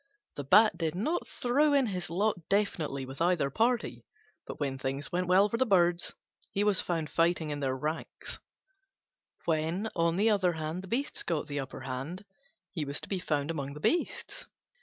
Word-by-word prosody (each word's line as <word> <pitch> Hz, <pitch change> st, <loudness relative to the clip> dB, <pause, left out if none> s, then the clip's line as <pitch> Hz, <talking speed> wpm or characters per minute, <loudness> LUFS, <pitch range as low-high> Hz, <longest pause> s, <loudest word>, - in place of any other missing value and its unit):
The 145 Hz, -, -4 dB
Bat 210 Hz, +10 st, +5 dB
did 165 Hz, -1 st, -1 dB
not 300 Hz, -, -1 dB
throw 285 Hz, +5 st, +2 dB
in 275 Hz, -2 st, +4 dB
his 185 Hz, -7 st, -3 dB
lot 180 Hz, -1 st, -1 dB
definitely 160 Hz, -9 st, 0 dB
with 135 Hz, +3 st, -8 dB
either 170 Hz, -5 st, +2 dB
party, 235 Hz, -, 0 dB, 0.4 s
but -, -, -7 dB
when 135 Hz, -2 st, -2 dB
things 135 Hz, +2 st, -3 dB
went 180 Hz, +1 st, 0 dB
well 190 Hz, +3 st, +5 dB
for 230 Hz, -, -2 dB
the 260 Hz, -, +4 dB
Birds 175 Hz, -3 st, +3 dB, 0.3 s
he 200 Hz, -, 0 dB
was 205 Hz, -2 st, +3 dB
found 165 Hz, -3 st, -1 dB
fighting 165 Hz, -2 st, +2 dB
in 145 Hz, -, -3 dB
their 130 Hz, -2 st, -1 dB
ranks; 155 Hz, +4 st, -4 dB, 1.1 s
when, 165 Hz, +6 st, 0 dB
on 165 Hz, 0 st, +2 dB
the 215 Hz, +4 st, +4 dB
other 190 Hz, -4 st, +2 dB
hand, 160 Hz, +2 st, -4 dB
the 190 Hz, -, -10 dB
Beasts 255 Hz, +8 st, -1 dB
got 160 Hz, -4 st, -1 dB
the 145 Hz, -1 st, -3 dB
upper 135 Hz, -1 st, -6 dB
hand, 135 Hz, -, -5 dB, 0.5 s
he 165 Hz, -5 st, -2 dB
was 140 Hz, 0 st, -1 dB
to -, -, -10 dB
be 195 Hz, -, -1 dB
found 150 Hz, -3 st, -1 dB
among 140 Hz, -3 st, -4 dB
the -, -, -7 dB
Beasts. 350 Hz, -, -1 dB
170 Hz, 185 wpm, -30 LUFS, 150-200 Hz, 1.1 s, Bat